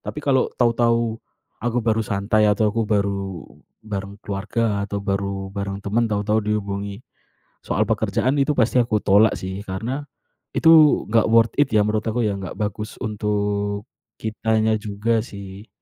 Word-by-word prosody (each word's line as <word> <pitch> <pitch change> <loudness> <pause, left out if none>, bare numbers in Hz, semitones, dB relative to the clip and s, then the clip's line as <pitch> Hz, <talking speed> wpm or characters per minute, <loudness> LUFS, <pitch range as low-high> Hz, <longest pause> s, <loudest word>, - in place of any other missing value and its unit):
Tapi 150 - -7
kalau 135 -2 +2
tahu-tahu 115 -1 +2 0.4
aku 120 +1 0
baru 115 -1 +2
santai, 105 +1 +1
atau 105 +1 +2
aku 115 -1 -1
baru 100 -3 -1 0.4
bareng 100 -1 -5
keluarga, 105 +1 -1
atau 100 - -3
baru 100 -1 -2
bareng 100 0 -4
temen, 115 +3 +1
tahu-tahu 105 +1 +1
dihubungi 100 +1 -3 0.6
soal - - +1
pekerjaan, 130 +3 +1
itu 145 +2 +2
pasti 125 +1 +3
aku 120 -2 +1
tolak 105 +3 +5
sih 95 +1 -5
karena 115 +9 -4 0.5
itu 160 -2 +6
gak 115 -1 +4
worth 115 0 +5
it 145 - +4
ya, 105 - +5
menurut 105 0 0
aku 115 +2 0
ya, 100 -2 0
nggak 95 -2 -7
bagus 105 0 -4
untuk 105 -1 -1 0.4
kitanya 110 0 +1
juga 110 +2 0
sih. 100 -1 -10
105 Hz, 150 wpm, -22 LUFS, 100-115 Hz, 0.6 s, itu